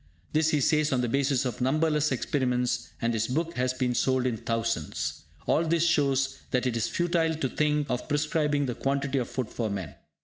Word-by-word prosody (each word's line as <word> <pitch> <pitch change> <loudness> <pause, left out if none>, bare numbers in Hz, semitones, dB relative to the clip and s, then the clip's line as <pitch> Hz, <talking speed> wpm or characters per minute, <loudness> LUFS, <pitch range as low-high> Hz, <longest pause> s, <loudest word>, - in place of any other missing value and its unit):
This 155 +1 +3
he 150 -2 +2
says 155 +2 +2
on 130 -2 +2
the 120 - 0
basis 135 +1 +1
of 125 -1 -3
numberless 150 +2 +2
experiments, 125 -2 0
and 115 0 +2
his 110 0 0
book 165 +6 -1
has 125 0 0
been 130 -1 -1
sold 130 +1 +1
in 125 -3 +1
thousands. 115 -8 -2 0.2
All 160 - +3
this 165 0 +2
shows 135 -4 +2
that 125 0 0
it 125 -2 0
is 115 -1 0
futile 170 -2 +1
to 150 -4 -1
think 150 0 +1
of 125 0 -3
prescribing 145 -1 +1
the 125 - -2
quantity 140 +1 -1
of 120 - -3
food 130 -4 -3
for 115 -2 -2
men. 100 -4 -4
135 Hz, 200 wpm, -28 LUFS, 125-150 Hz, 0.2 s, This